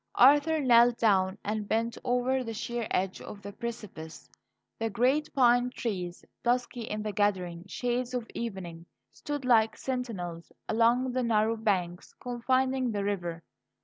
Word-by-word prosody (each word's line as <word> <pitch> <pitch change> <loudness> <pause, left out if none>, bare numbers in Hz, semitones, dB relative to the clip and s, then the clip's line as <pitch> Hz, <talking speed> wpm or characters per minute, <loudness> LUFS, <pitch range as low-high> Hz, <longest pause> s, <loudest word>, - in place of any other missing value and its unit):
Arthur 290 +5 +6
knelt 240 -3 +5
down 190 -3 +2
and 210 0 -2
bent 230 +2 0
over 250 +1 +1
the 225 -2 -5
sheer 235 +1 -3
edge 185 0 -1
of 200 -1 -10
the 200 0 -7
precipice. 200 -8 -7 0.5
The 225 0 0
great 260 +8 +1
pine 245 -1 +4
trees, 185 -8 -4 0.2
dusky 245 0 0
in 215 -1 -4
the 215 - -2
gathering 185 -4 -1
shades 245 +4 -2
of 245 -2 -2
evening, 180 -7 -6 0.3
stood 290 -3 -5
like 225 -3 +4
sentinels 200 -11 -4 0.2
along 235 +3 +3
the 255 +1 0
narrow 225 -1 +2
banks 185 -6 -1
confining 255 +1 0
the 205 -2 -2
river. 175 -5 -3
230 Hz, 145 wpm, -29 LUFS, 200-250 Hz, 0.5 s, Arthur